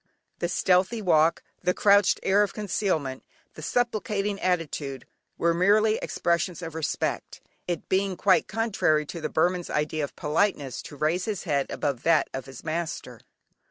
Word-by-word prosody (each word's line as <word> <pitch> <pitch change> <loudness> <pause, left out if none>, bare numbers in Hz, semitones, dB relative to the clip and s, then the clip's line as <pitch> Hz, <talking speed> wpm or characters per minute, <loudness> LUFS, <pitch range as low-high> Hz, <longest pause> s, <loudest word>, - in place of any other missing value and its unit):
The 175 - -1
stealthy 185 +5 +2
walk, 165 -4 +3 0.2
the 180 - +1
crouched 200 -1 +4
air 195 +2 +4
of 205 - 0
concealment, 180 -10 -1 0.3
the - - -10
supplicating 210 0 -1
attitude, 150 -7 -2 0.3
were 170 0 +2
merely 210 +5 +3
expressions 170 +1 -1
of 165 -2 -6
respect, 160 -2 -3 0.3
it 175 -3 -3
being 190 -1 0
quite - - +3
contrary 200 -9 +1
to 170 +3 -7
the - - -2
Burman's 175 +2 +1
idea 150 +1 -1
of 145 - -5
politeness 150 - 0
to - - -10
raise 160 +5 0
his 215 -4 -3
head 140 -5 0
above 140 -5 -2
that 165 -2 +3
of 135 0 -5
his 135 - -11
master. 165 +1 -4
175 Hz, 155 wpm, -26 LUFS, 155-200 Hz, 0.3 s, crouched